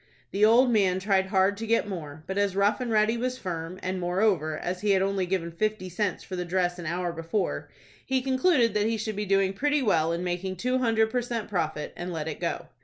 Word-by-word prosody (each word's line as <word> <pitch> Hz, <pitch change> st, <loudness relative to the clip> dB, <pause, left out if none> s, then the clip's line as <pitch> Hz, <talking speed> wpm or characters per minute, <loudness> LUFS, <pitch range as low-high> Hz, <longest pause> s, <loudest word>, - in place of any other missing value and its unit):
The 200 Hz, -, 0 dB
old 240 Hz, +4 st, +6 dB
man 190 Hz, -4 st, +3 dB
tried 190 Hz, -1 st, +1 dB
hard 190 Hz, +1 st, +2 dB
to 225 Hz, +1 st, -5 dB
get 230 Hz, -1 st, +2 dB
more, 155 Hz, -6 st, -7 dB
but 190 Hz, -, -4 dB
as 200 Hz, -2 st, +1 dB
Rough 205 Hz, +3 st, +2 dB
and 245 Hz, -, -2 dB
Ready 220 Hz, +1 st, +3 dB
was 250 Hz, +1 st, -2 dB
firm, 175 Hz, -3 st, -5 dB
and, 185 Hz, 0 st, -2 dB
moreover, 175 Hz, -4 st, +1 dB
as 180 Hz, +2 st, -4 dB
he 210 Hz, -, 0 dB
had 190 Hz, 0 st, +3 dB
only 195 Hz, -1 st, 0 dB
given 175 Hz, -2 st, -1 dB
fifty 215 Hz, +1 st, -2 dB
cents 190 Hz, +2 st, -2 dB
for 185 Hz, -, -6 dB
the 180 Hz, -, -2 dB
dress 180 Hz, 0 st, 0 dB
an 170 Hz, -, -5 dB
hour 175 Hz, +1 st, -2 dB
before, 165 Hz, +5 st, -2 dB, 0.3 s
he 260 Hz, -1 st, 0 dB
concluded 260 Hz, -, +3 dB
that 210 Hz, 0 st, +1 dB
he 225 Hz, 0 st, 0 dB
should 215 Hz, 0 st, -3 dB
be 210 Hz, 0 st, -3 dB
doing 195 Hz, 0 st, +2 dB
pretty 290 Hz, +6 st, +1 dB
well 165 Hz, -7 st, +2 dB
in 170 Hz, +1 st, -2 dB
making 180 Hz, +1 st, -2 dB
two 250 Hz, +7 st, 0 dB
hundred 225 Hz, -3 st, +2 dB
per 250 Hz, -, +1 dB
cent. 235 Hz, -2 st, -4 dB
profit, 160 Hz, -6 st, -2 dB
and 175 Hz, +1 st, -5 dB
let 160 Hz, -2 st, -4 dB
it 155 Hz, -, -5 dB
go. -, -, -2 dB
195 Hz, 235 wpm, -27 LUFS, 180-220 Hz, 0.3 s, old